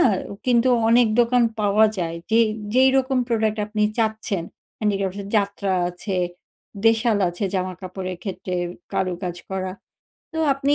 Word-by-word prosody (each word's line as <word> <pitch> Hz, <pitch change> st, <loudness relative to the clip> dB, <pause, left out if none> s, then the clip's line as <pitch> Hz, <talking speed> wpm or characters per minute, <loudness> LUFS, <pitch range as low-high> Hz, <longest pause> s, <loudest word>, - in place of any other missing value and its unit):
না -, -, +6 dB, 0.4 s
কিন্তু 245 Hz, 0 st, +4 dB, 0.2 s
অনেক 235 Hz, 0 st, +5 dB
দোকান 240 Hz, +1 st, +3 dB, 0.2 s
পাওয়া 210 Hz, +1 st, +4 dB
যায় 165 Hz, -2 st, -2 dB
যে 225 Hz, +1 st, +5 dB, 0.3 s
যেই 260 Hz, +1 st, +6 dB
রকম 265 Hz, 0 st, +2 dB
প্রোডাক্ট 220 Hz, -2 st, +1 dB
আপনি 210 Hz, 0 st, -1 dB, 0.2 s
চাচ্ছেন 220 Hz, -5 st, -1 dB, 0.3 s
হ্যান্ডিক্রাফ 195 Hz, -3 st, 0 dB
এ -, -, -9 dB
যাত্রা 200 Hz, -1 st, -1 dB, 0.2 s
আছে 185 Hz, +2 st, -4 dB, 0.7 s
দেশাল 225 Hz, -1 st, +3 dB
আছে 175 Hz, +4 st, -4 dB
জামাকাপড়ের 185 Hz, 0 st, -4 dB
ক্ষেত্রে 185 Hz, -2 st, -4 dB, 0.4 s
কারুকাজ 180 Hz, -1 st, -2 dB
করা 190 Hz, -1 st, -3 dB, 0.6 s
তো 320 Hz, -, -4 dB, 0.2 s
আপনি 275 Hz, +1 st, +1 dB
210 Hz, 135 wpm, -23 LUFS, 185-230 Hz, 0.7 s, না